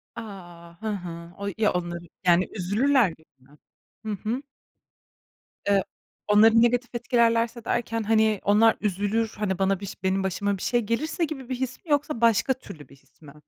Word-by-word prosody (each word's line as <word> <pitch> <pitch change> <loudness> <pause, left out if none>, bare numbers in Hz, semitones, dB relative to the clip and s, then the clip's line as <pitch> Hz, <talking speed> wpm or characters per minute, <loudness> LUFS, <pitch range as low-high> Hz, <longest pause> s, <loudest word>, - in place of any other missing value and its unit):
A. 175 -6 -10
Hı 220 - -4
hı. 170 -3 -6
O 200 0 -5
ya 215 -3 +2
onlar, 175 -1 -3 0.3
yani 175 +1 +4
üzülürler 220 +5 +2
gibi 160 -1 -15
mi? 140 +3 -22 0.5
Hı 215 - -2 0.2
hı. 250 +4 -1 1.3
E 195 -1 +3 0.4
onları 220 +2 +6
negatif 245 +1 +1
etkilerlerse 235 -1 +1
derken, 230 -1 -1
hani, 220 -1 +3
onlar 215 +3 +5
üzülür, 210 +3 0
hani 195 -3 -2
bana 195 -1 +1
biş 195 -1 -9
benim 190 +1 +1
başıma 200 +1 -1
bir - - -11
şey 240 -1 +1
gelirse 305 +10 -1
gibi 270 -4 -7
bir 255 - -1
his 255 0 -3
mi 305 - -6
yoksa 290 -4 0
başka 230 +3 +4
türlü 155 - -12
bir 140 - -16
his 140 - -30
mi? 145 -2 -13
210 Hz, 170 wpm, -25 LUFS, 185-235 Hz, 1.3 s, onları